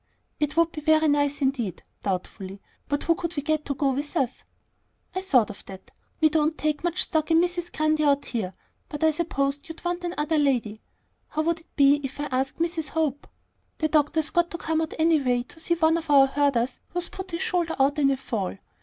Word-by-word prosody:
"It 300 Hz, +1 st, -1 dB
would 335 Hz, 0 st, +4 dB
be 305 Hz, -, -6 dB
very 315 Hz, +1 st, +4 dB
nice 285 Hz, -1 st, +1 dB
indeed," 250 Hz, -8 st, -1 dB, 0.2 s
doubtfully; 190 Hz, 0 st, -4 dB, 0.3 s
"but 285 Hz, 0 st, 0 dB
who 335 Hz, -, +3 dB
could 340 Hz, 0 st, -4 dB
we 285 Hz, -, -2 dB
get 310 Hz, +1 st, 0 dB
to 280 Hz, -, -2 dB
go 275 Hz, 0 st, +1 dB
with 290 Hz, +5 st, -3 dB
us?" 260 Hz, -4 st, -1 dB, 0.7 s
"I 375 Hz, -, -2 dB
thought 255 Hz, -, +3 dB
of 200 Hz, -, -12 dB
that. 190 Hz, -1 st, -11 dB, 0.3 s
We 315 Hz, -1 st, +5 dB
don't 310 Hz, 0 st, +1 dB
take 305 Hz, 0 st, -1 dB
much 345 Hz, +1 st, +1 dB
stock 315 Hz, -2 st, 0 dB
in 325 Hz, 0 st, +5 dB
Mrs. 350 Hz, 0 st, -1 dB
Grundy 310 Hz, 0 st, +1 dB
out 285 Hz, -1 st, +3 dB
here; 195 Hz, -6 st, -3 dB, 0.3 s
but 295 Hz, 0 st, -4 dB
I 315 Hz, -, +5 dB
supposed 290 Hz, -3 st, -1 dB
you'd 325 Hz, +2 st, -10 dB
want 350 Hz, 0 st, -1 dB
another 320 Hz, -3 st, 0 dB
lady. 240 Hz, -7 st, 0 dB, 0.5 s
How 310 Hz, -, -1 dB
would 335 Hz, +1 st, 0 dB
it 325 Hz, -, -25 dB
be 285 Hz, 0 st, +5 dB
if 270 Hz, +1 st, -6 dB
I 295 Hz, -, -1 dB
asked 265 Hz, +1 st, -1 dB
Mrs. 330 Hz, -3 st, -1 dB
Hope? 295 Hz, -3 st, -1 dB, 0.5 s
The 310 Hz, -, 0 dB
doctor's 305 Hz, +1 st, +2 dB
got 345 Hz, 0 st, +2 dB
to 340 Hz, -, -5 dB
come 320 Hz, -1 st, -1 dB
out 320 Hz, -, -3 dB
anyway 285 Hz, -7 st, +2 dB
to 320 Hz, -, -16 dB
see 340 Hz, +1 st, +1 dB
one 325 Hz, -1 st, +3 dB
of 325 Hz, -2 st, -6 dB
our 275 Hz, -2 st, +7 dB
herders 270 Hz, -3 st, 0 dB
who's 350 Hz, 0 st, -3 dB
put 380 Hz, 0 st, -7 dB
his 335 Hz, +2 st, -3 dB
shoulder 345 Hz, -2 st, 0 dB
out 280 Hz, +2 st, +2 dB
in 275 Hz, -2 st, +4 dB
a 270 Hz, -, +1 dB
fall. 215 Hz, -8 st, -3 dB
300 Hz, 215 wpm, -25 LUFS, 275-325 Hz, 0.7 s, our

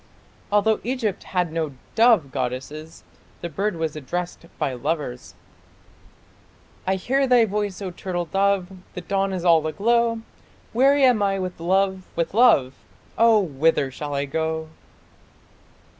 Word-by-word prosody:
Although 210 Hz, +1 st, +3 dB
Egypt 235 Hz, -5 st, -2 dB
had 180 Hz, -3 st, -1 dB
no 160 Hz, -3 st, -2 dB, 0.2 s
dove 220 Hz, -, +4 dB
goddess, 135 Hz, +5 st, -5 dB, 0.4 s
the 170 Hz, -, -4 dB
bird 195 Hz, +5 st, -2 dB
was 160 Hz, -2 st, -2 dB
addressed 170 Hz, +4 st, -5 dB
by 135 Hz, -, -1 dB
lovers 140 Hz, -1 st, -4 dB, 1.5 s
I 190 Hz, -, +2 dB
hear 270 Hz, +8 st, 0 dB
thy 245 Hz, -2 st, +5 dB
voice, 205 Hz, -2 st, -3 dB
O 185 Hz, -, -4 dB
turtle 175 Hz, -1 st, -4 dB
dove 195 Hz, +2 st, +1 dB, 0.2 s
The 180 Hz, -, -5 dB
dawn 195 Hz, +2 st, -1 dB
is 185 Hz, -2 st, -4 dB
all 165 Hz, -2 st, +4 dB
aglow 230 Hz, +6 st, +1 dB, 0.5 s
Weary 275 Hz, +4 st, +4 dB
am 250 Hz, -5 st, +4 dB
I 195 Hz, -1 st, +1 dB
with 185 Hz, -2 st, -5 dB
love, 190 Hz, +2 st, 0 dB
with 170 Hz, +1 st, -1 dB
love, 210 Hz, -, +4 dB, 0.4 s
Oh, 225 Hz, -2 st, +5 dB
whither 150 Hz, -4 st, +1 dB
shall 145 Hz, +2 st, -5 dB
I 140 Hz, 0 st, -1 dB
go? 160 Hz, +2 st, -3 dB
185 Hz, 135 wpm, -23 LUFS, 160-210 Hz, 1.5 s, thy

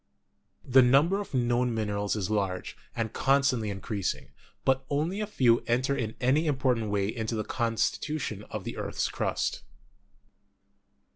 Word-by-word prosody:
The 130 Hz, +1 st, +6 dB
number 140 Hz, +10 st, +4 dB
of 200 Hz, -, -7 dB
known 120 Hz, -1 st, +1 dB
minerals 105 Hz, -2 st, -1 dB
is 105 Hz, -1 st, -2 dB
large, 95 Hz, -3 st, -1 dB, 0.2 s
and 115 Hz, -1 st, -2 dB
constantly 135 Hz, -5 st, +2 dB
increasing, 100 Hz, 0 st, -3 dB, 0.3 s
but 135 Hz, 0 st, +2 dB
only 160 Hz, +8 st, -1 dB
a 210 Hz, -, -2 dB
few 125 Hz, -, +3 dB
enter 130 Hz, +4 st, +1 dB
in 110 Hz, -3 st, -3 dB
any 140 Hz, +6 st, +2 dB
important 130 Hz, -6 st, +1 dB
way 100 Hz, -1 st, +1 dB
into 110 Hz, +1 st, -3 dB
the 110 Hz, -, -1 dB
constitution 115 Hz, +1 st, -1 dB
of -, -, -5 dB
the -, -, -6 dB
earth's -, -, -2 dB
crust. -, -, -1 dB
120 Hz, 140 wpm, -28 LUFS, 110-135 Hz, 0.3 s, The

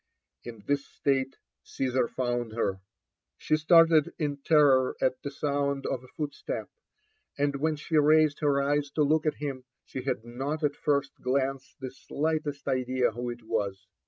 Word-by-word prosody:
la 120 Hz, -, -5 dB
this 140 Hz, -1 st, 0 dB
state 135 Hz, -2 st, -1 dB, 0.2 s
Caesar 130 Hz, -2 st, -1 dB
found 120 Hz, -3 st, -2 dB
her. 95 Hz, -4 st, -1 dB, 0.6 s
She -, -, +1 dB
started 160 Hz, 0 st, +5 dB
in 145 Hz, -3 st, -2 dB
terror 140 Hz, -3 st, +4 dB
at 130 Hz, 0 st, 0 dB
the 140 Hz, -, -4 dB
sound 140 Hz, -1 st, -1 dB
of 130 Hz, -2 st, -2 dB
a -, -, -14 dB
footstep; 155 Hz, -, -5 dB, 0.7 s
and 140 Hz, 0 st, 0 dB
when 155 Hz, +2 st, 0 dB
she 155 Hz, +1 st, -1 dB
raised 150 Hz, 0 st, +4 dB
her 145 Hz, -2 st, +2 dB
eyes 145 Hz, +1 st, +1 dB
to 150 Hz, -, +3 dB
look 155 Hz, +2 st, +2 dB
at 155 Hz, -, +1 dB
him, 140 Hz, -3 st, -5 dB, 0.2 s
she 130 Hz, -, -6 dB
had 125 Hz, -3 st, -3 dB
not 135 Hz, +6 st, -4 dB
at 145 Hz, -, +3 dB
the -, -, -24 dB
first 140 Hz, -2 st, +1 dB
glanee 135 Hz, +1 st, 0 dB, 0.2 s
the 130 Hz, -2 st, -6 dB
slightest 150 Hz, +1 st, -3 dB
idea 130 Hz, -1 st, +1 dB
who 120 Hz, +2 st, -4 dB
it 120 Hz, -1 st, -7 dB
was. 100 Hz, -3 st, -2 dB
140 Hz, 165 wpm, -28 LUFS, 130-150 Hz, 0.7 s, started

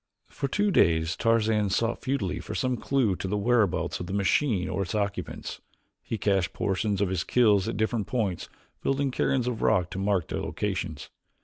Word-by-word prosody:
For 140 Hz, -, -3 dB
two 205 Hz, +8 st, +1 dB
days 80 Hz, -, +3 dB
Tarzan 110 Hz, -2 st, +2 dB
sought 115 Hz, +5 st, 0 dB
futilely 125 Hz, -10 st, -1 dB
for -, -, -6 dB
some 130 Hz, -1 st, 0 dB
clew 120 Hz, -5 st, +1 dB
to -, -, -4 dB
the 105 Hz, +2 st, -1 dB
whereabouts 100 Hz, -7 st, +1 dB
of 90 Hz, -, -5 dB
the 95 Hz, -, -5 dB
machine 100 Hz, 0 st, +1 dB
or -, -, -2 dB
its 95 Hz, +3 st, -3 dB
occupants. 100 Hz, -1 st, -3 dB, 0.4 s
He 115 Hz, -, -4 dB
cached 95 Hz, -3 st, +1 dB
portions 100 Hz, 0 st, -1 dB
of 100 Hz, -, +2 dB
his 95 Hz, -, -1 dB
kills 105 Hz, -6 st, +3 dB
at -, -, -3 dB
different 110 Hz, -1 st, 0 dB
points, 105 Hz, -8 st, -2 dB, 0.3 s
building 135 Hz, 0 st, 0 dB
cairns 130 Hz, -1 st, +1 dB
of 125 Hz, -2 st, -2 dB
rock 90 Hz, -1 st, +2 dB
to 95 Hz, -, -4 dB
mark 95 Hz, -4 st, 0 dB
their -, -, -2 dB
locations. 90 Hz, -7 st, -3 dB
105 Hz, 185 wpm, -27 LUFS, 95-120 Hz, 0.4 s, days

